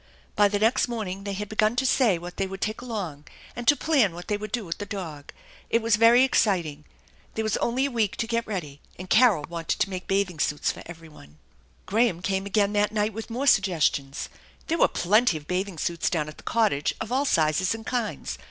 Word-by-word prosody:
By 205 - +5
the 205 0 -1
next 225 +4 +2
morning 200 -5 -5
they 200 - -3
had 210 +2 -4
begun 215 +1 +1
to 260 +2 0
say 245 -7 +3
what 175 +1 -9
they 195 - -1
would 195 0 -7
take 215 +3 -3
along, 190 - -5 0.3
and 240 -1 -6
to 290 - +7
plan 270 - +2
what 175 +1 -9
they 210 - +1
would 210 +1 -6
do 235 -4 -2
with 170 - -5
the 205 - -4
dog. 160 -8 -7 0.4
It 230 - +3
was 225 -1 +3
very 230 +3 +6
exciting. 170 - +1 0.5
There 220 - -1
was 220 - 0
only 255 +3 0
a 280 - -2
week 225 -5 0
to - - -2
get 230 0 -2
ready, 155 -9 -5 0.2
and 185 +1 -9
Carol 215 - +5
wanted 165 -1 -3
to 195 - 0
make 185 -1 -6
bathing 195 -4 0
suits 150 -1 0
for - - -10
everybody. 160 - -13 0.5
Graham 205 -4 +1
came 195 0 -1
again 205 0 +1
that 210 0 +2
night 210 0 0
with 225 +3 -7
more 250 +5 -3
suggestions. 160 - +2 0.4
There 330 0 -1
were - - +6
plenty 205 0 +2
of 150 - -11
bathing 185 +1 -2
suits 170 +1 -1
down 155 -4 -1
at 155 - -10
the - - -13
cottage, 215 -11 +1
of 220 - -5
all 270 +3 +1
sizes 165 - +2
and 225 0 -10
kinds. 240 -3 -3
205 Hz, 220 wpm, -25 LUFS, 175-225 Hz, 0.5 s, to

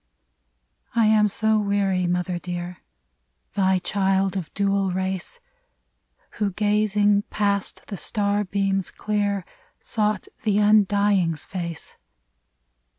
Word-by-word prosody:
I 230 -1 +4
am 215 -1 +5
so 220 +2 +1
weary, 200 -3 +1
mother 180 0 -1
dear! 175 0 -5 0.4
— - - -49
Thy 190 -2 +2
child, 195 +1 0
of 180 -5 -4
dual 195 -1 +1
race, 190 - -3 1.0
Who 205 -3 0
gazing 205 0 +2
past 200 -2 -1
the 200 - -6
star 205 +2 0
beams 195 -1 -1
clear. 205 -3 -1 0.3
Sought 210 -3 -1
the 210 -3 +1
Undying's 205 -5 +3
face 170 -4 -6
200 Hz, 105 wpm, -24 LUFS, 185-210 Hz, 1.0 s, am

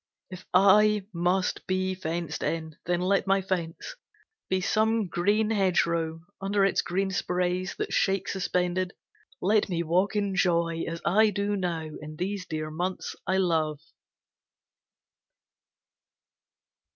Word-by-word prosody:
If 185 0 -9
I 205 +2 +5
must 180 +2 0
be 185 0 0
fenced 170 -3 -4
in, 160 -1 -3
then 175 0 +1
let 190 +1 +1
my 195 0 +4
fence 185 - -4 0.5
Be 185 - +2
some 220 +3 +1
green 205 +6 +1
hedgerow; 170 -5 +1 0.2
under 195 0 +2
its 195 - +2
green 190 +2 -1
sprays, 180 0 -1
That - - -4
shake 195 -1 +1
suspended, 180 -1 -1 0.5
let 210 +2 +3
me 170 -2 -1
walk 180 +6 +1
in 200 -2 0
joy 170 -3 +1
As 165 0 -5
I 215 +4 +5
do 205 0 -1
now, 170 -4 -2
in 155 0 -8
these 185 +2 -3
dear 155 -1 -4
months 180 +4 -3
I 190 - +2
love. 160 -5 +1
185 Hz, 125 wpm, -27 LUFS, 170-195 Hz, 0.5 s, I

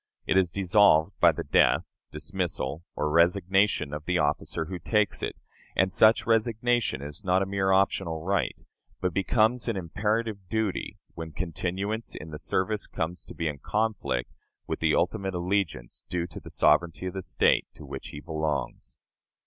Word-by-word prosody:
It - - +1
is 95 -2 +4
dissolved 95 -3 +4
by - - +7
the - - -5
death, - - +4 0.3
dismissal, 80 -3 -3
or 75 - 0
resignation 90 0 +3
of 75 +1 -5
the 90 -1 +1
officer 75 +1 0
who 90 +2 -6
takes 105 +3 +1
it; - - -3 0.4
and 95 0 +3
such 110 +1 +5
resignation 115 - +1
is 75 0 -7
not 95 +1 +2
a - - -2
mere 95 0 0
optional 95 -4 +1
right, 100 +3 0 0.4
but 90 -2 -1
becomes 110 +6 +2
an 115 -4 0
imperative 105 +2 -2
duty 110 -4 -2 0.2
when 80 -1 -7
continuance 95 +6 -3
in 80 +1 -8
the 75 - -6
service 95 +5 -1
comes 85 +2 -4
to - - -11
be 85 - -2
in 75 -2 -4
conflict 105 - -1 0.3
with - - -3
the 80 -2 +2
ultimate 95 +1 0
allegiance 90 -9 -2
due 90 -1 -1
to 85 - -9
the - - -11
sovereignty 85 +4 +2
of 90 - -3
the 95 - -4
State 90 -1 +2
to - - -11
which - - -7
he 75 - -8
belongs. 75 -4 -3
95 Hz, 165 wpm, -27 LUFS, 80-100 Hz, 0.4 s, by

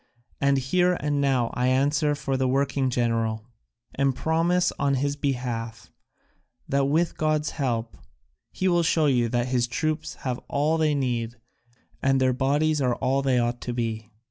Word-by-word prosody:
And 140 0 +3
here 180 +7 +2
and 145 -1 0
now 130 -4 +1
I 125 +1 0
answer 145 +3 +2
for 135 -2 -2
the 130 0 +1
working 135 0 +1
general, 115 -3 -1 0.5
and 135 -1 +1
promise 170 +4 +1
on 140 -1 +2
his 140 +2 -1
behalf 120 -5 -4 0.8
that 140 0 +1
with 160 +4 +1
God's 155 -1 0
help 120 -6 -2 0.6
he 185 - -1
will 175 -1 +3
show 160 -1 +2
you 125 -5 +2
that 120 +1 -1
his 125 -2 +1
troops 155 +4 -2
have 125 -2 -1
all 150 +3 +1
they 155 -2 +2
need 120 -4 -2 0.7
and 135 0 +2
their 130 -1 +2
bodies 145 +4 +1
are 125 -2 +1
all 135 +1 0
they 135 -2 +1
ought 120 0 0
to 120 - -4
be. 110 -2 -3
135 Hz, 165 wpm, -25 LUFS, 125-150 Hz, 0.8 s, And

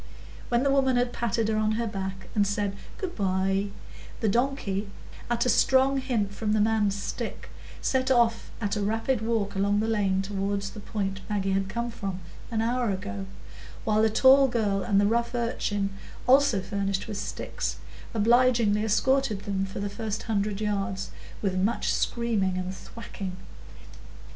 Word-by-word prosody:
When 240 +1 +2
the 280 - +3
woman 265 -2 +3
had 245 0 +1
patted 230 -1 0
her 220 0 +1
on 215 0 +1
the 235 - 0
back, 190 -3 -4
and 205 -2 +3
said 200 0 -1 0.2
"Good 375 -4 -4
by," 195 0 +1 0.5
the 220 - 0
donkey, 215 -4 0 0.4
at 240 0 +1
a - - +2
strong 265 +2 +4
hint 230 -7 -1
from 210 +1 -1
the 215 - +3
man's 210 -2 +2
stick, - - -5 0.3
set 260 0 +1
off 235 -3 +3
at 205 -2 -1
a 210 - -1
rapid 225 +4 0
walk 220 -3 0
along 200 +1 +2
the 220 - 0
lane 195 -3 +1
toward 200 0 -2
the 200 +2 -6
point 195 -2 -3
Maggie 195 -2 0
had 195 0 0
come 235 +3 -2
from 195 -4 -4 0.3
an 225 -2 0
hour 240 0 +1
ago, 200 0 -4 0.6
while 215 -1 +3
the 220 - +4
tall 265 +5 +6
girl 210 -5 0
and 200 -2 +2
the 205 - +4
rough 235 +3 +1
urchin, 205 -4 -1 0.3
also 265 -5 +5
furnished 200 0 -2
with 210 -2 -4
sticks, 200 - -3 0.4
obligingly 230 -1 +4
escorted 235 0 +2
them 195 -1 -1
for 190 - -6
the 205 - -1
first 215 +1 -4
hundred 205 -2 -1
yards, 195 -2 -2 0.3
with 195 -2 +1
much 195 +5 +1
screaming 215 -6 0
and 185 +1 -3
thwacking. 195 -4 -7
210 Hz, 165 wpm, -27 LUFS, 195-235 Hz, 0.6 s, tall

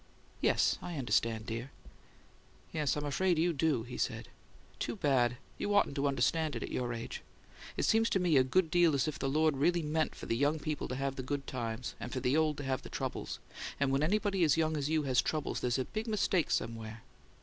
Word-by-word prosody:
"Yes. - - +3
I 175 - -5
understand, 115 -3 +1
dear." 115 +4 -4 1.0
"Yes, 150 -2 0
I'm 150 - -3
afraid 175 +5 +1
you 170 +2 +2
do," 145 -5 +1
he 125 +1 -7
said. - - -2 0.5
"Too - - -2
bad! 130 - +2 0.2
You 205 - 0
oughtn't 205 - +3
to 140 0 +1
understand 140 +3 +1
it 115 - -3
at - - -6
your 125 -1 -1
age. 115 -1 -5 0.6
It - - 0
seems 225 +1 +3
to 195 - +2
me 175 -4 +2
a 130 - +6
good 160 +6 +2
deal 170 -4 +4
as 135 - +1
if 155 0 -3
the 135 - 0
Lord 155 0 +2
really 170 +4 +2
meant 155 +1 0
for - - -8
the 115 - 0
young 145 +5 +2
people 155 -1 -3
to 125 - -4
have 135 0 -2
the - - -2
good 140 +2 -3
times, 120 -1 -4
and 120 - -6
for 130 - -2
the 125 +2 +1
old 155 -2 +2
to 145 - -5
have 130 -1 -1
the - - -10
troubles; - - -4 0.4
and 140 -1 +2
when 135 +1 +2
anybody 195 +2 +2
as 155 -2 +4
young 160 -1 +1
as 145 -1 -1
you 155 -1 +2
has 130 -3 +3
trouble 155 -2 -2
there's 120 0 0
a 130 - -1
big 220 +1 -4
mistake 200 -5 +1
somewhere." 110 -1 -3
145 Hz, 225 wpm, -32 LUFS, 130-160 Hz, 1.0 s, a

